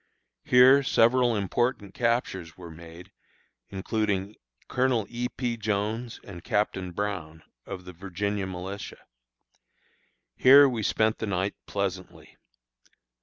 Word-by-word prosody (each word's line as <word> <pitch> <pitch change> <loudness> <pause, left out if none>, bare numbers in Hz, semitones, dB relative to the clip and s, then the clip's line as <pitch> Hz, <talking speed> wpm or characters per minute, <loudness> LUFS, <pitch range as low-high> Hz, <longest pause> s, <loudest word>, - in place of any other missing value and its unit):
Here 130 +3 +6
several 125 -1 +3
important 105 0 -1
captures 115 -9 -1
were 85 -2 -10
made, 85 +2 -13 0.6
including 100 0 -2 0.3
Colonel 125 -4 +1
E. 120 +1 -2
P. 120 -2 -3
Jones 110 +2 -2
and 90 -4 -10
Captain 95 -3 -1
Brown, 85 -5 -4 0.2
of 95 -2 -7
the 90 - -9
Virginia 100 +2 -3
militia. 95 +2 -7 1.3
Here 140 +2 +8
we 120 -4 -2
spent 110 +1 +1
the 110 - -3
night 95 0 -1
pleasantly. 95 -2 -5
100 Hz, 110 wpm, -27 LUFS, 95-120 Hz, 1.3 s, Here